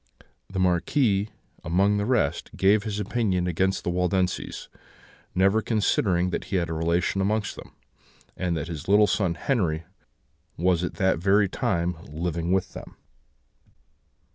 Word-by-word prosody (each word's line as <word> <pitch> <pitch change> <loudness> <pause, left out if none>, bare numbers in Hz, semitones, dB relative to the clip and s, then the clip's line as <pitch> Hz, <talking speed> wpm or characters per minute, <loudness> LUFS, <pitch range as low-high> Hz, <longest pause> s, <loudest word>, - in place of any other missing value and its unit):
The 95 - -6
Marquis, 95 - +2 0.3
among 100 +5 +2
the 100 +1 -1
rest, 125 -3 0
gave 100 +2 +4
his 105 -1 -3
opinion 100 -4 0
against 95 +2 0
the 90 - -1
Waldenses; 90 +1 -1 0.7
never 95 +4 +3
considering 95 -5 +1
that - - -3
he 100 - -4
had 85 -2 0
a - - -1
relation 85 +4 0
amongst 105 +1 -1
them, - - -12 0.6
and 90 -2 -1
that 80 0 -4
his 80 -4 -7
little 105 +2 +6
son 95 -3 0
Henri 85 - 0 0.7
was 90 0 +2
at 90 - -3
that 95 -3 +1
very 100 +3 +3
time 90 -6 -1
living 85 +3 -3
with 95 -1 0
them. - - -10
95 Hz, 140 wpm, -25 LUFS, 85-100 Hz, 0.7 s, little